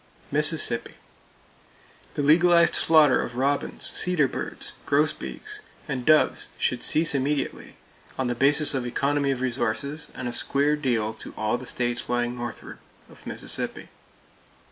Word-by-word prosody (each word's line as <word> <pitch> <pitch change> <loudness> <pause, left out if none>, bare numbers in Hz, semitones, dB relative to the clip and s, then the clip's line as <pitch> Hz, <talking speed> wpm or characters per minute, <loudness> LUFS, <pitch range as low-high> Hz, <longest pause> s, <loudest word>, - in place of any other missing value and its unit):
Mississippi: - - +1 1.2
The 145 - -1
legalized 170 +3 +5
slaughter 155 -4 +5
of 120 - -6
robins, 140 +3 -1
cedar 175 -6 +3
birds, - - -6
grosbeaks 145 - -1 0.3
and 125 -1 -4
doves 155 0 +3
should - - -1
cease 160 +1 +3
immediately, 140 +1 -2 0.4
on 130 - -1
the 125 - 0
basis 145 +5 +3
of 130 -3 -2
economy 140 +3 0
of 130 -2 -1
resources 130 +4 -2
and 125 - -5
a 120 - -4
square 140 +4 +1
deal 120 -7 -1
to - - -10
all 110 +2 0
the 130 - -9
states 120 0 -2
lying 120 0 0
northward 120 0 -7 0.3
of - - -15
Mississippi. - - -3
140 Hz, 135 wpm, -25 LUFS, 120-150 Hz, 1.2 s, legalized